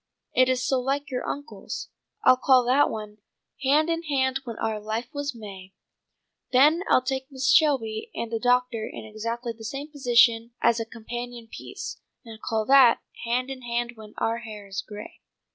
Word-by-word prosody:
It 255 0 +4
is 255 -1 +1
so 265 - +2
like 275 +3 -2
your 250 - -2
uncle's. 285 +2 -6 0.3
I'll - - +7
call 255 -1 +4
that 260 +4 +4
one 210 -1 -7 0.4
'Hand 290 +4 +3
in 330 0 0
hand 270 -4 0
when 230 -2 -6
our 220 -1 -1
life 220 +3 -3
was 285 -2 -3
May.' 195 -4 -10 0.8
Then 295 +7 +5
I'll 255 - +5
take 265 +1 -3
Mrs. 270 0 +1
Shelby 240 -9 +2
and 230 -1 -4
the 225 - -1
doctor 245 -2 +1
in - - -8
exactly 230 +2 -4
the 225 0 -13
same 275 +7 -5
position 235 -4 +3
as 235 0 +3
a 225 - -2
companion 240 +1 -7
piece, - - -7 0.3
and 225 -1 -11
call 220 -1 -1
that 265 -2 +6 0.3
'_Hand 250 +2 0
in 265 -1 -6
hand 240 0 -2
when 215 -2 -13
our 230 +1 0
hair 215 -3 -9
is 195 0 -4
gray. 210 0 -10
240 Hz, 180 wpm, -26 LUFS, 225-265 Hz, 0.8 s, I'll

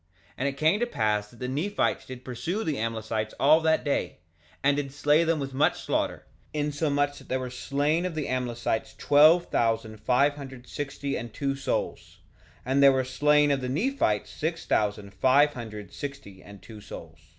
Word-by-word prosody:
2:19 - - -29
And 135 - 0
it 140 0 -3
came 160 +8 +3
to 240 - 0
pass 105 - 0
that 120 - -18
the 125 - -4
Nephites 160 +11 -1
did 130 -1 -9
pursue 130 - -3
the 155 - -2
Amlicites 110 -1 -3
all 155 +3 +6
that 160 0 +2
day, 145 - -1 0.5
and 140 0 +4
did 140 -2 -3
slay 145 +3 +3
them 165 -1 +1
with 135 -1 -4
much 140 +3 +2
slaughter, - - -1 0.3
insomuch 145 -1 0
that - - -17
there 130 - 0
were 130 -1 -5
slain 145 +6 0
of 175 - -7
the 155 -2 -2
Amlicites 120 -3 -2
twelve 155 +4 +5
thousand 110 -1 0
five 140 +5 +3
hundred 135 -3 -10
thirty 140 +1 -4
and 115 0 -5
two 140 -1 -1
souls; 135 - -3 0.5
and 135 +2 +2
there 140 0 +8
were 130 -1 +1
slain 145 +3 +3
of 140 -1 +1
the 125 - -3
Nephites 155 - 0
six 165 +2 -3
thousand 105 -1 0
five 135 +8 +4
hundred 105 -5 -8
sixty 140 -10 -8
and 100 -2 -14
two 110 0 -11
souls. 80 -5 -11
135 Hz, 185 wpm, -27 LUFS, 115-145 Hz, 0.5 s, there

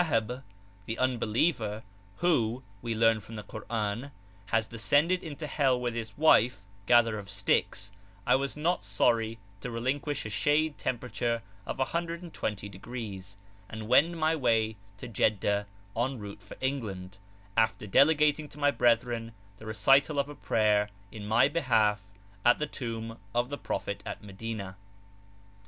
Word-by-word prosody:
ab, 115 +3 0 0.5
the 110 - -3
unbeliever, 115 -2 +1 0.3
who, 130 -8 +1 0.2
we 115 -1 -2
learn 115 0 +4
from 110 +2 -11
the 105 - -6
Koran, 110 +4 -3 0.4
has 110 -1 +2
descended 145 +11 +2
into 155 -1 -6
hell 135 -4 +2
with 120 -1 -2
his 110 -3 -5
wife, 125 -7 +4 0.2
gatherer 115 -3 +5
of 100 -1 -10
sticks, 100 0 0 0.3
I - - +5
was 140 +2 -1
not 170 - +1
sorry 110 +3 +1 0.2
to 125 - -5
relinquish 130 +5 -2
a 110 - -5
shade 150 +7 +1
temperature 120 -2 -2 0.2
of - - -3
120°, 115 - -4 0.3
and 110 0 -6
wend 165 +8 +4
my 160 0 +2
way 115 -6 +2 0.2
to - - -7
Jeddah 105 -2 +1 0.3
en 130 +3 0
route 105 -2 -8
for - - -12
England, 100 -8 -3 0.4
after 110 -1 +2
delegating 150 +6 +4
to - - -13
my 145 -1 +3
brethren 115 -2 +1 0.2
the 110 - -11
recital 135 +7 +4
of 140 0 +1
a - - -6
prayer 105 -5 +2 0.2
in 105 -2 -7
my 115 +5 +5
behalf 110 -9 +2 0.4
at 120 - +6
the 150 - -1
Tomb 115 -5 -5 0.2
of 120 +1 +1
the 145 - -4
Prophet 100 0 -3
at - - -6
Medina. 100 -1 -6
115 Hz, 145 wpm, -29 LUFS, 110-140 Hz, 0.5 s, at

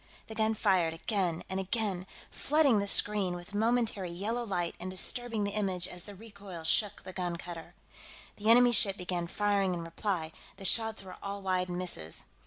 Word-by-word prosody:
The 220 - -9
gun 220 0 +1
fired 185 -6 +2
again 175 -2 -1
and 190 - -2
again, 195 -2 -1 0.2
flooding 285 -6 +3
the 200 - -2
screen 200 -3 +4
with 175 +3 -10
momentary 220 -3 0
yellow 210 +8 -2
light 175 -6 -1
and 180 +2 -5
disturbing 225 +4 0
the 200 - -1
image 190 -4 0
as 180 -1 -7
the 205 - -9
recoil 200 -5 -10
shook 200 +5 +1
the 185 - -8
gun 180 -2 -2
cutter. 170 -1 -9 0.6
The 210 +1 0
enemy 245 +1 +7
ship 200 -3 +5
began 175 -1 -3
firing 200 -1 +1
in 170 - -5
reply, 165 -1 -3 0.3
the 195 - -8
shots 220 +1 +2
were 185 -1 -10
all 200 0 -5
wide 185 -1 0
misses. 175 - -4
195 Hz, 180 wpm, -31 LUFS, 180-215 Hz, 0.6 s, enemy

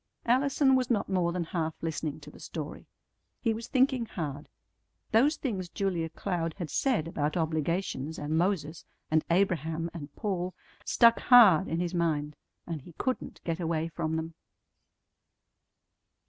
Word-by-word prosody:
Allison 265 +2 +3
was 255 -1 +1
not 215 -5 +1
more 180 -3 +1
than 175 0 -1
half 160 -1 -2
listening 160 -2 -3
to 145 +1 -11
the - - -15
story. 155 -2 -7 0.5
He 225 -3 +1
was 230 +2 -6
thinking 260 -2 +2
hard. 150 -7 -5 0.6
Those 270 +8 +4
things 195 - -3
Julia 175 -4 -1
Cloud 165 -1 -3
had 170 -5 -5
said 240 - +1
about 155 -1 -1
obligations 160 -1 -1
and 150 +2 -2
Moses 165 -3 0 0.3
and 155 0 +3
Abraham 165 -2 +1
and 150 -4 -8
Paul 185 -3 -2 0.3
stuck 235 -1 +5
hard 220 -10 +7
in 165 - -1
his 175 0 -2
mind, 150 -4 0 0.3
and 160 -4 -5
he 170 - -14
couldn't 255 +9 -3
get 165 0 -2
away 165 -1 -1
from 160 0 -2
them. 160 +1 -3
170 Hz, 145 wpm, -29 LUFS, 160-205 Hz, 0.6 s, hard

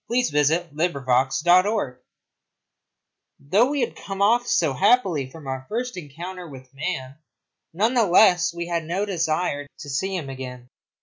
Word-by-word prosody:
CHAPTER - - 0 0.2
IV 145 - +4 0.3
THE 155 -2 -1
FOREST 130 +4 +1
FIRE 180 - +3 1.4
Though 200 - +2
we 290 -1 -1
had 240 - -2
come 195 -1 -7
off 235 +5 +3
so 155 -5 +2
happily 185 - +2
from 155 +1 -12
our 130 0 -5
first 245 +2 -3
encounter 175 +3 -8
with 130 -1 -13
man, 140 -2 -4 0.5
none 215 +9 +1
the 235 -4 +3
less 175 -1 +5
we 170 0 -5
had 170 -2 -2
no 185 +5 -1
desire 160 -5 -1
to 145 - -9
see 190 +8 -1
him 165 -6 -4
again. 125 -2 -8
170 Hz, 160 wpm, -23 LUFS, 140-195 Hz, 1.4 s, less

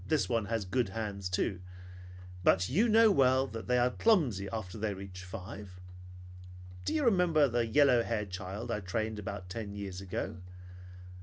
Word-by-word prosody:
Well, - - -14
this 155 -2 +2
one 115 -3 0
has 110 -1 -2
good 105 +3 0
hands 100 -2 -4
too. 90 +1 -1 0.8
But 90 0 +3
you 210 - +3
know 220 0 +6
well 130 -5 +4
that 115 -4 -7
they 125 - +3
are 125 +1 +3
clumsy 130 - +2
after 110 -2 -5
they 105 -1 -1
reach 95 -1 -9
five. 95 0 -9 1.1
Do - - -1
you 300 -3 +1
remember 175 -9 +4
the 120 -2 0
yellow 130 -1 +5
haired 105 -4 -3
child 95 +6 -5
I 105 - -1
trained 110 +3 -3
about 95 -2 -6
ten 100 +1 -6
years 95 -2 -6
ago? 90 -3 -4
110 Hz, 170 wpm, -31 LUFS, 95-130 Hz, 1.1 s, know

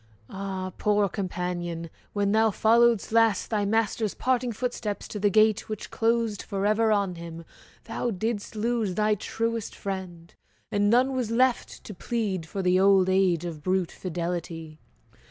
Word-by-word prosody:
Ah, 190 -1 -4
poor 210 -1 +2
companion! 180 -3 -4 0.2
when 200 -1 0
thou 220 +1 +4
followedst 230 +1 +3
last 225 -2 +3
Thy 210 -2 +1
master's 220 0 0
parting 250 -1 0
footsteps 230 -3 -3
to 210 - -6
the 205 0 +3
gate 215 +1 +3
Which 215 -1 -6
closed 225 -2 0
forever 210 +2 +1
on 200 -4 +1
him, 165 0 -8 0.4
thou 230 +1 -3
didst 220 +1 -3
lose 220 -3 -1
Thy 215 +1 +2
truest 230 +2 -3
friend, 185 -4 -6 0.4
and 205 0 +2
none 255 +4 +3
was 250 -4 -1
left 250 +2 +1
to 210 - -8
plead 195 -4 -2
For 195 +3 -4
the 180 0 +3
old 190 -1 +5
age 185 -3 +2
of 160 -3 -6
brute 185 0 0
fidelity! 170 -3 -5
205 Hz, 150 wpm, -26 LUFS, 185-225 Hz, 0.4 s, old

